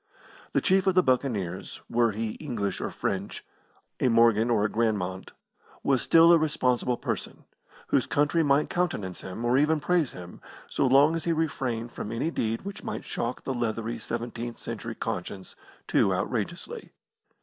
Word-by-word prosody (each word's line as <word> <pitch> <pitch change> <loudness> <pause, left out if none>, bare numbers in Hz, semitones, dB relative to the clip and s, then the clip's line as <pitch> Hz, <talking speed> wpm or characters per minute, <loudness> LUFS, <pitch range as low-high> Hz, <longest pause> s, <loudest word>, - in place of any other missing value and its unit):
The - - +3
chief 190 0 +3
of 190 - +3
the 185 - +5
Buccaneers, 110 - -1
were 120 -1 +2
he 110 +1 -3
English 105 - -3
or - - -2
French, 95 +1 -3 0.5
a - - +2
Morgan 115 -1 +4
or 110 -3 +3
a - - +4
Granmont, 100 -5 -1 0.5
was 135 -3 +2
still 165 +1 +6
a 170 - +6
responsible 125 -5 +1
person, - - -5 0.4
whose - - +2
country 150 +3 +2
might 145 -1 +3
countenance 105 - -2
him, 95 +6 -6
or 125 +3 +4
even 155 +2 +3
praise 165 -2 +1
him, 90 0 -10 0.3
so 135 - +1
long 140 +5 +5
as 165 - -3
he 170 - +2
refrained 130 -7 -2
from 105 - -6
any 120 +8 -1
deed 115 -6 -2
which 200 +1 -7
might - - -5
shock 120 +1 -3
the 135 - -2
leathery 115 -1 -2
seventeenth 120 0 -5
century - - -6
conscience 95 -2 -5 0.3
too - - +3
outrageously. - - -3
120 Hz, 160 wpm, -27 LUFS, 110-150 Hz, 0.5 s, still